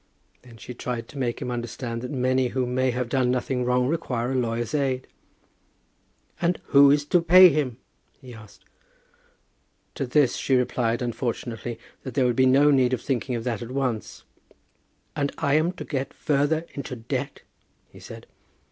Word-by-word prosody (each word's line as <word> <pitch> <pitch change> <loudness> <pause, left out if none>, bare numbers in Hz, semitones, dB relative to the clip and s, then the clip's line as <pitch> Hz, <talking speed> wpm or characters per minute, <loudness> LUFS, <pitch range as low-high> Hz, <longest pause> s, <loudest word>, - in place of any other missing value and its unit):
Then 120 -2 -15
she 125 - -9
tried 120 -1 -5
to 140 - -11
make 120 -3 -2
him 125 - -4
understand 120 0 -5
that 125 - -6
many 130 -1 +1
who 130 +1 -1
may 130 +1 0
have 125 0 -2
done 130 0 +1
nothing 125 0 -1
wrong 125 0 +1
require 130 -6 -2
a - - -1
lawyer's 120 -1 -2
aid. 135 -3 0 1.4
"And 175 0 +1
who 140 -1 +7
is 145 +1 +3
to 175 +4 +3
pay 180 +2 +8
him?" 140 -6 -1 0.4
he 125 -2 -12
asked. 100 -4 -15 1.3
To 135 - -3
this 130 -1 +2
she 135 - +1
replied, 125 -1 0
unfortunately, 120 -1 -4 0.2
that 130 -3 -8
there 130 - +3
would 120 -1 +1
be 130 0 +4
no 140 +3 +5
need 130 -2 +3
of 125 - -1
thinking 130 -1 -2
of 115 - -4
that 115 -4 -3
at 120 - -7
once. 130 -4 -3 0.9
"And 140 -1 -1
I 140 - 0
am 155 +3 +3
to - - -8
get 135 -3 -4
further 150 +3 0
into 135 -2 -6
debt!" 125 +4 -5 0.4
he - - -16
said. - - -11
130 Hz, 175 wpm, -25 LUFS, 120-140 Hz, 1.4 s, pay